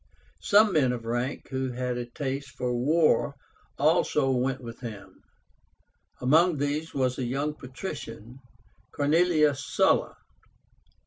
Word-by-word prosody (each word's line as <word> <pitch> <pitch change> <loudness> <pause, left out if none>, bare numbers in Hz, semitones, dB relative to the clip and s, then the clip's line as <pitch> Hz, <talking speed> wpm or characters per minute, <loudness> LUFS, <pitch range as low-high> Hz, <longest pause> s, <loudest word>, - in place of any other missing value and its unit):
Some 210 0 +4
men 130 -5 +3
of 115 -2 -6
rank 120 +4 -3
who 130 -1 -2
had 125 0 -2
a 120 0 -4
taste 135 +2 -4
for 125 -1 -1
war 145 +2 +2 0.4
also 150 -3 +2
went 130 +1 0
with 115 -2 -9
him. 100 -6 -9 1.0
Among 160 +6 +4
these 145 +3 -2
was 130 -2 -1
a - - -1
young 140 +5 -1
patrician, 130 - -8 0.5
CORNELIUS 150 -1 +2
SULLA. - - +1
135 Hz, 120 wpm, -27 LUFS, 125-150 Hz, 1.0 s, Some